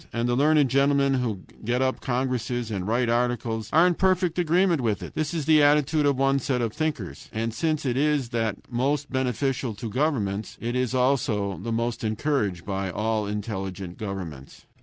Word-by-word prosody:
And 115 +1 -1
the 120 - +1
learned 150 +1 +4
gentlemen 140 +1 +3
who 120 -7 -1 0.2
get 120 +3 0
up 130 0 -1
congresses 125 -2 -1
and 95 -2 -3
write 120 +2 +1
articles 115 -2 0
are 165 +4 +6
in 180 - +4
perfect 180 -1 +1
agreement 175 -1 +3
with 110 -4 -1
it. - - -8
This 155 -1 -1
is 165 -4 -2
the 155 -1 +5
attitude 150 +1 +3
of 140 -2 +2
one 135 +1 +2
set 130 -1 -1
of 115 -3 -1
thinkers. 120 - -4
And 115 +1 -2
since 155 +4 -1
it 125 -2 0
is 145 -2 +1
that 115 -3 -1
most 135 +4 -1
beneficial 130 -2 -1
to 115 +2 -5
governments, 110 -7 -1
it 120 +1 -3
is 125 0 0
also 110 -7 +1
the 115 - -4
most 115 +1 -1
encouraged 110 - -1
by 95 -1 -2
all 110 +2 -1
intelligent 95 -3 -5
governments. 90 -10 -7
125 Hz, 180 wpm, -25 LUFS, 110-140 Hz, 0.2 s, are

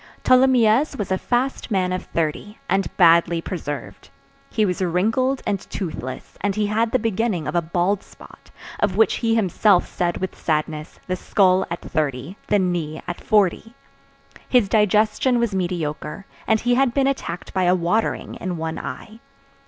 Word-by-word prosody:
Tholomyès 255 0 +4
was 205 -3 -4
a 190 - +2
fast 255 +2 -1
man 185 -4 0
of 185 - -4
thirty, 165 +6 -3
and 195 -1 +1
badly 170 -1 +5
preserved. 145 -6 -6 0.4
He 215 - +1
was 180 -1 -2
wrinkled 225 +10 +1
and 200 - 0
toothless, 155 -9 -6
and 200 -1 0
he 210 0 +1
had 220 +2 +1
the - - +3
beginning 220 -6 -1
of - - -3
a 175 - +2
bald 175 +4 0
spot, - - -17 0.3
of 205 -2 0
which 220 - +3
he 225 -1 +1
himself 200 -2 +3
said 175 -1 -2
with 190 -1 -4
sadness, 155 -1 -3
the 185 - -2
skull 185 0 +2
at 170 - -4
thirty, 145 +1 -3
the 205 - +3
knee 175 -5 -2
at 175 -1 -6
forty. 215 +2 +1 0.7
His 245 -5 +4
digestion 215 +4 +2
was 235 -3 0
mediocre, 175 -2 -3 0.2
and 220 0 +3
he 245 0 +2
had 250 -1 +2
been 275 -1 +3
attacked 230 -10 -3
by 185 -1 +1
a 180 +1 +4
watering 180 +6 -1
in 180 -1 -3
one 160 0 -4
eye. 175 - -8
190 Hz, 165 wpm, -22 LUFS, 170-220 Hz, 0.7 s, badly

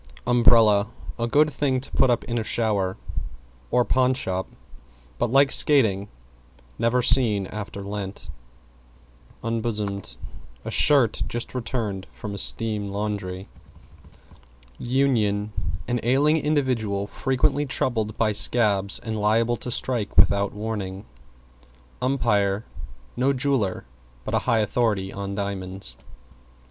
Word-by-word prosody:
=UMBRELLA= 115 -4 +5 0.3
A 115 - 0
good 150 +5 +3
thing 135 -3 0
to 135 - -8
put 130 - +3
up 120 -1 +1
in 120 0 -2
a - - -2
shower 105 -5 0 0.7
or 125 -1 +2
pawn 130 0 +2
shop; 95 -6 -2 0.7
but, 120 -1 0
like 135 0 +4
skating, 110 -9 +4 0.7
never 125 +2 +2
seen 110 -7 +5
after 100 0 -7
Lent. 100 -5 -6 1.1
=UNBOSOMED= 105 - -3 0.5
A - - -4
shirt 135 -7 +4
just 120 0 -4
returned 115 -6 -3
from 105 -2 -7
a 100 - -3
steam 105 -2 -2
laundry. 100 -2 -4 1.3
=UNION= 110 -6 0 0.3
An 120 0 0
ailing 140 +6 +3
individual 125 -10 0
frequently 135 +6 0
troubled 110 -5 -1
by 110 -2 +2
scabs 105 -2 +2
and 110 -1 -4
liable 115 +3 +1
to 125 - -6
strike 120 -3 -2
without 100 0 +4
warning. 105 -2 -5 1.0
=UMPIRE= 105 -6 +1 0.5
No 130 +3 +2
jeweler, 130 - -1 0.4
but - - -4
a - - +3
high 115 -2 +3
authority 105 -3 0
on 100 0 -5
diamonds. 95 -1 -5
110 Hz, 115 wpm, -24 LUFS, 100-125 Hz, 1.3 s, =UMBRELLA=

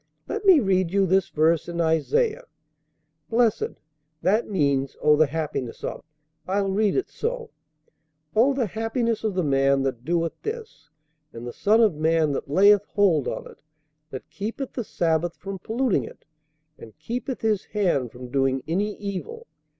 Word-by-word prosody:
"Let - - -4
me 375 -5 +8
read 185 -6 +1
you 195 0 +3
this 190 +1 +2
verse 160 +2 +2
in 170 0 -4
Isaiah: 430 - +1 0.8
'Blessed' 230 -1 +1 0.4
that 215 +5 +2
means, 140 -7 0
'O 150 0 +5
the 155 0 +4
happiness 150 -5 -4
of': - - -5 0.4
I'll 195 +1 0
read 205 +1 +1
it 390 - 0
so 470 0 -4 0.8
'O 260 +5 +4
the 260 -3 +1
happiness 225 +2 -2
of 215 -4 -1
the 185 - +1
man 135 -1 +2
that 130 -3 -3
doeth 165 +1 0
this, 440 - -7 0.4
and 115 +1 -9
the 120 - -6
son 220 +3 +3
of 215 -5 +4
man 155 0 +2
that 140 - -4
layeth 200 +5 +5
hold 185 -10 +2
on - - -4
it; - - -14 0.5
that 130 -3 -8
keepeth 230 +6 -5
the 240 - -3
sabbath 170 -3 0
from 195 0 -7
polluting 230 +2 0
it, - - -13 0.5
and 110 - -13
keepeth 250 +2 -4
his 215 -3 0
hand 170 - 0
from 125 0 -10
doing 135 -1 +1
any 200 +6 -1
evil. 205 - -6
190 Hz, 160 wpm, -24 LUFS, 155-225 Hz, 0.8 s, me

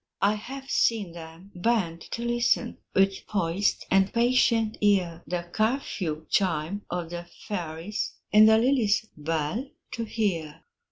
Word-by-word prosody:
I 200 +1 +5
have 265 +6 -7
seen 220 -9 +1
them 165 +3 -11
bend 180 -4 0
to 235 - -4
listen, 240 0 +1 0.2
With 195 0 +2
poised 195 -1 0
and 195 0 +4
patient 235 -2 +2
ear, 185 -5 +2
The 175 -1 -2
curfew 200 - -1
chime 185 0 0
of 175 -1 -4
the 175 0 -6 0.2
fairies, 175 0 -4 0.2
In 215 +1 +8
the 220 0 +6
lily's 230 -3 +2
bell 160 - -2 0.2
to 230 - -3
hear. 170 -9 -2
200 Hz, 130 wpm, -27 LUFS, 170-225 Hz, 0.2 s, In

